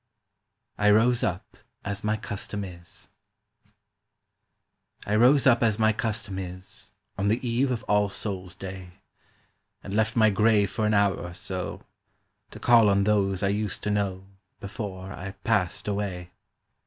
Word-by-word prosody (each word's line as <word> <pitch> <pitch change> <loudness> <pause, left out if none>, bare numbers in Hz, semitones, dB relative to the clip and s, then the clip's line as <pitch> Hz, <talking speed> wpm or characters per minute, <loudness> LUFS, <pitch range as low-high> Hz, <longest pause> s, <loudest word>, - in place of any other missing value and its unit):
"I 105 - +4
ROSE 115 +3 +4
UP 95 -6 -3 0.3
AS 100 0 -4
MY 105 +1 +1
CUSTOM 105 0 -5
IS" 85 -2 -8 2.0
I 105 - 0
ROSE 130 +5 +5
up 120 -3 +5
as 110 -3 +2
my 110 -1 +3
custom 105 -4 -3
is 95 0 -7 0.3
On 100 - +1
the 115 +4 0
eve 125 +4 +1
of 125 -1 -2
All 105 -3 +2
Souls' 95 -3 -4
day, 95 -1 -8 0.9
And 95 - -6
left 110 +1 +1
my 110 -2 +5
grave 105 0 +3
for 110 -2 0
an 105 - +2
hour 100 -1 +4
or 90 0 -7
so 95 -1 -5 0.7
To - - -11
call 115 -3 +6
on 100 0 +3
those 100 -2 +1
I 100 - +2
used 105 -1 -2
to 105 - 0
know 95 -2 -1 0.3
Before 100 -1 -6
I 95 +1 -7
passed 105 -2 0
away. 95 -4 -3
100 Hz, 150 wpm, -26 LUFS, 95-110 Hz, 2.0 s, call